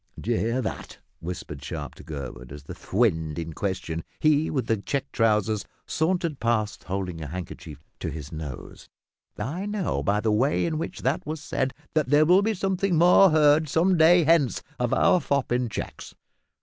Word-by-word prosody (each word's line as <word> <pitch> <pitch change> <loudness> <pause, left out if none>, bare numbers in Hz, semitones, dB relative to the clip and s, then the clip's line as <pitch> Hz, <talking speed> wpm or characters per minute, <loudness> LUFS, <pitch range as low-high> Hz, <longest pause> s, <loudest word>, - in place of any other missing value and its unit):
"D'you 115 +2 -1
hear 115 +4 0
that?" - - -6 0.2
whispered 80 -4 -6
Sharp - - -5
to - - -14
Gurwood, 65 -5 -7
as 70 0 -9
the - - -8
"fwend" 80 -8 0
in 85 -1 -4
question 85 -3 -3 0.2
he 155 0 +3
with 130 -5 -1
the 110 0 +1
checked 135 +7 -3
trousers 110 -2 +2 0.2
sauntered 165 -2 -1
past 110 -3 -1
holding 90 -3 -4
a 75 - -5
handkerchief 80 -3 -8 0.2
to - - -3
his 75 0 -7
nose. 75 -6 -8 0.5
"I 160 - -3
know 205 -3 -1
by 105 0 +1
the 110 0 +1
way 130 +11 +2
in 160 -2 -1
which - - -5
that 135 +5 0
was 155 +1 -3
said 135 -3 -2 0.2
that 155 -5 +1
there 145 +2 +5
will 180 +4 +5
be 220 +1 0
something 190 -1 0
more 180 +4 +7
heard 155 -1 +4
some 180 +6 +3
day 170 +1 +6
hence 155 -5 +2 0.2
of 125 -1 0
our 180 - +4
fop 140 -4 -1
in 125 -1 +1
checks. - - -7
125 Hz, 180 wpm, -25 LUFS, -, 0.5 s, more